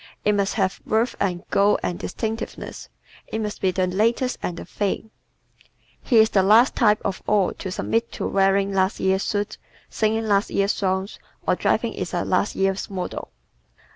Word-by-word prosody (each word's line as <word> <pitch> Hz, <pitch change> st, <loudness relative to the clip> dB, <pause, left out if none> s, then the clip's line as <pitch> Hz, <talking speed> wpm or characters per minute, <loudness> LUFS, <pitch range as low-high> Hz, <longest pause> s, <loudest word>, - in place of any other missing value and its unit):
It 210 Hz, -, +4 dB
must 200 Hz, -1 st, 0 dB
have 190 Hz, -3 st, 0 dB
verve 225 Hz, +3 st, +1 dB
and 180 Hz, -3 st, -1 dB
"go" 200 Hz, +1 st, +4 dB
and 175 Hz, -, -2 dB
distinctiveness. 225 Hz, +4 st, -5 dB, 0.4 s
It 220 Hz, -, -3 dB
must 210 Hz, -1 st, -4 dB
be 190 Hz, -, +3 dB
"the 185 Hz, 0 st, +1 dB
latest" 230 Hz, +7 st, 0 dB
and 175 Hz, -, -3 dB
"the -, -, -7 dB
thing." 205 Hz, +4 st, -3 dB, 0.9 s
He 240 Hz, -, +2 dB
is 220 Hz, 0 st, +6 dB
the 195 Hz, -, +4 dB
last 220 Hz, +7 st, +5 dB
type 215 Hz, -4 st, +4 dB
of 195 Hz, -2 st, -2 dB
all 205 Hz, -3 st, +3 dB
to 190 Hz, -, -4 dB
submit 230 Hz, +5 st, -1 dB
to -, -, -4 dB
wearing 195 Hz, 0 st, +2 dB
last 190 Hz, 0 st, +1 dB
year's 190 Hz, 0 st, +2 dB
suit, 205 Hz, 0 st, -2 dB, 0.3 s
singing 220 Hz, +1 st, 0 dB
last 200 Hz, -1 st, +2 dB
year's 200 Hz, +1 st, +1 dB
songs, 190 Hz, 0 st, -2 dB, 0.3 s
or -, -, +4 dB
driving -, -, 0 dB
in -, -, -4 dB
a -, -, -1 dB
last -, -, +1 dB
year's 195 Hz, 0 st, 0 dB
model. 185 Hz, -2 st, -5 dB
200 Hz, 175 wpm, -23 LUFS, 190-220 Hz, 0.9 s, is